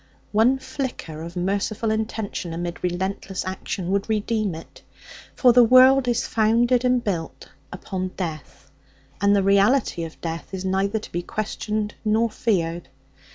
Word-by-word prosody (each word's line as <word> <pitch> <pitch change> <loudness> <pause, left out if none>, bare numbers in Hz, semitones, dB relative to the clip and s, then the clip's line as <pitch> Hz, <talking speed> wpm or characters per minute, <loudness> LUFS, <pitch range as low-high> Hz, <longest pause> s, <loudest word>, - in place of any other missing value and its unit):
One 230 +5 +4
flicker 255 - -5
of 170 +2 -8
merciful 200 +4 -1
intention 220 -5 -3
amid 175 0 -5
relentless 190 +2 -3
action 185 -1 -4
would 200 +2 0
redeem 215 -3 0
it. 165 - -12 0.5
For 250 -2 +5
the 245 0 +7
world 255 +2 +6
is 240 -1 +1
founded 235 +3 +2
and 250 -1 +2
built 170 -6 -4 0.2
up 180 +2 -11
on 185 0 -1
death, 155 -5 -6 0.5
and 200 0 +4
the 200 - +2
reality 200 -1 +3
of 165 -1 -8
death 165 +3 -5
is 190 0 -5
neither 195 +3 0
to 215 - -8
be 175 - -2
questioned 210 +2 -3
nor 220 +1 +2
feared. 170 - -1
200 Hz, 150 wpm, -23 LUFS, 180-225 Hz, 0.5 s, the